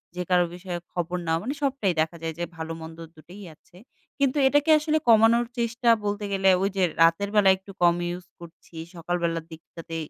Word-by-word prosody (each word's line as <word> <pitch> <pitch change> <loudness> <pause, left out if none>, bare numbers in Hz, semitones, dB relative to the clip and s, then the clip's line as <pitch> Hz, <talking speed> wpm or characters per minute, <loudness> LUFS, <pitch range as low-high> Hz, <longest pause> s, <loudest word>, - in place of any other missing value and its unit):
যে 180 - -3
কারো 180 -1 +3
বিষয়ে 180 -1 -6
খবর 175 0 -3
নেওয়া 165 0 0
মানে 260 +5 -3
সবটাই 265 -9 0
দেখা 160 +2 -2
যায় 165 0 -4
যে - - -2
ভালো 160 0 -5
মন্দ 160 0 -10 0.2
দুটোই 180 +6 -13
আছে 175 - -23 0.4
কিন্তু 275 0 +1
এটাকে 290 +3 +2
আসলে 310 +1 0
কমানোর 230 +1 +5
চেষ্টা 235 +1 0 0.2
বলতে 205 0 -2
গেলে 195 -1 +2
ওই 195 - +1
যে 190 - +2 0.2
রাতের 165 +5 +3
বেলায় 195 -2 +5
একটু 190 +1 -14
কম 170 -1 +5 0.2
use 180 0 -12
করছি 170 0 -15 0.2
সকালবেলার 170 -1 -2
দিকটাতে 165 +1 -10
180 Hz, 185 wpm, -25 LUFS, 165-220 Hz, 0.4 s, কমানোর